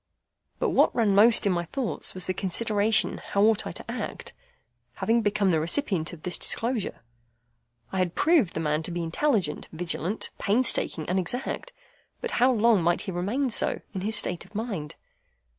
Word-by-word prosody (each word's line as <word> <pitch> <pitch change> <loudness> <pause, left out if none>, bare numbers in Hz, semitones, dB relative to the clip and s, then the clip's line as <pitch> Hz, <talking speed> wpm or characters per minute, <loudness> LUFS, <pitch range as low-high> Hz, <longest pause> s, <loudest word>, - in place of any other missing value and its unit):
But - - 0
what - - +3
ran 220 -4 +3
most 220 +3 +5
in 200 - +3
my 175 -1 -1
thoughts 245 +3 -3
was 185 - -3
the 185 - -1
consideration 210 +3 +1
how 200 - 0
ought 220 0 +3
I - - -4
to - - -7
act, - - -6 0.6
having 230 +1 +1
become 205 -2 +1
the 160 - +2
recipient 170 - +1
of 170 -3 -12
this 180 - -1
disclosure? 230 - -1 0.9
I 190 - -2
had 180 -2 0
proved 305 - +3
the - - -1
man 150 0 0
to 160 - -6
be 175 0 -3
intelligent, 180 - 0
vigilant, 175 +4 -3
painstaking, 205 -7 +1
and 185 +2 +1
exact; 245 - -3 0.5
but 475 - -4
how 255 +1 +6
long 230 -4 +3
might 175 +1 +1
he 195 - -5
remain 215 +10 -1
so, - - +2
in 190 - -4
his 215 +3 -1
state 180 -4 0
of - - -20
mind? 200 -10 -4
200 Hz, 175 wpm, -26 LUFS, 175-230 Hz, 0.9 s, how